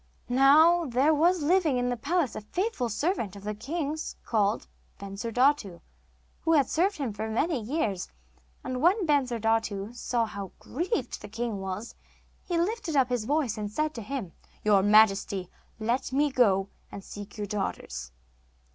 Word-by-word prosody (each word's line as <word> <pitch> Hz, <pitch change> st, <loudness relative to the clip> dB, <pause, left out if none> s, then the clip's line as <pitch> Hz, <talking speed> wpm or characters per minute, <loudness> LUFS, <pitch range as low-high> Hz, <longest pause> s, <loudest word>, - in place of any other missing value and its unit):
Now 310 Hz, +7 st, +6 dB
there 265 Hz, +5 st, +3 dB
was 335 Hz, +2 st, +3 dB
living 325 Hz, -4 st, +3 dB
in 245 Hz, 0 st, 0 dB
the 245 Hz, -, 0 dB
palace 290 Hz, +3 st, 0 dB
a -, -, -5 dB
faithful 310 Hz, -, -2 dB
servant 230 Hz, -, -1 dB
of 200 Hz, -, -11 dB
the 210 Hz, +1 st, -3 dB
king's 300 Hz, +7 st, -4 dB
called 210 Hz, -1 st, +1 dB, 0.3 s
Bensurdatu, 215 Hz, 0 st, 0 dB, 0.6 s
who 325 Hz, -, +1 dB
had 285 Hz, -4 st, +4 dB
served 380 Hz, +5 st, +1 dB
him 265 Hz, -7 st, -3 dB
for 215 Hz, +2 st, -4 dB
many 260 Hz, +5 st, 0 dB
years, 215 Hz, -, -2 dB, 0.5 s
and 255 Hz, 0 st, -3 dB
when 370 Hz, +5 st, +3 dB
Bensurdatu 225 Hz, -7 st, 0 dB
saw 240 Hz, -1 st, -1 dB
how 200 Hz, -3 st, -7 dB
grieved 330 Hz, -, -3 dB
the 210 Hz, -, -9 dB
king 225 Hz, -1 st, -3 dB
was, 190 Hz, +4 st, -5 dB, 0.5 s
he 350 Hz, -2 st, -2 dB
lifted 350 Hz, -2 st, -1 dB
up 265 Hz, -2 st, +4 dB
his 245 Hz, -3 st, -1 dB
voice 270 Hz, -5 st, 0 dB
and 210 Hz, -1 st, -3 dB
said 305 Hz, +6 st, -1 dB
to 230 Hz, -, -6 dB
him: 220 Hz, -5 st, -5 dB, 0.3 s
'Your 205 Hz, -2 st, +5 dB
majesty, 200 Hz, -3 st, +3 dB, 0.3 s
let 235 Hz, +5 st, -1 dB
me 285 Hz, +2 st, +2 dB
go 200 Hz, -6 st, +3 dB, 0.2 s
and 200 Hz, -, -8 dB
seek 205 Hz, +2 st, -9 dB
your 210 Hz, -, -3 dB
daughters. 65 Hz, -, -4 dB
245 Hz, 155 wpm, -28 LUFS, 210-305 Hz, 0.6 s, Now